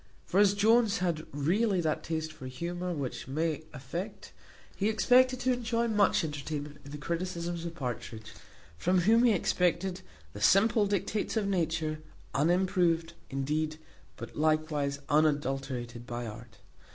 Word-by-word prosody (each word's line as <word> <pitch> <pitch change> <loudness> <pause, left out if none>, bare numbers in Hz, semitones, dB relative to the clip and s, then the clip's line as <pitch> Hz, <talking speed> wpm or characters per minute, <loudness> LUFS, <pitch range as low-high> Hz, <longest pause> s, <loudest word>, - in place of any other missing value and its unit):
For 190 - +1
as 205 -1 +5
Jones 220 +1 +4
had 170 -3 -1
really 185 +8 +1
that 155 -3 0
taste 160 -1 -3
for 130 -4 -9
humour 175 +7 -4
which 140 -8 -4
many 155 +2 -1
affect, 170 +9 -6 0.4
he 205 +2 +1
expected 250 +4 +4
to 255 0 +2
enjoy 235 -1 0
much 210 -5 +3
entertainment 150 -1 -5
in 140 - -11
the 150 - -6
criticisms 170 +1 -3
of 170 -1 -5
Partridge, 115 -5 -5 0.5
from 180 +1 +3
whom 225 +6 +5
he 240 - +6
expected 180 0 0 0.3
the 105 - -8
simple 210 - +4
dictates 205 +3 -1
of 215 - +1
nature, 160 -4 0 0.3
unimproved, 170 +1 +2 0.2
indeed, 150 +3 -1 0.4
but - - -8
likewise 155 -2 +1
unadulterated, 135 -5 0
by 120 0 -4
art. 115 +1 -10
165 Hz, 140 wpm, -30 LUFS, 145-195 Hz, 0.5 s, he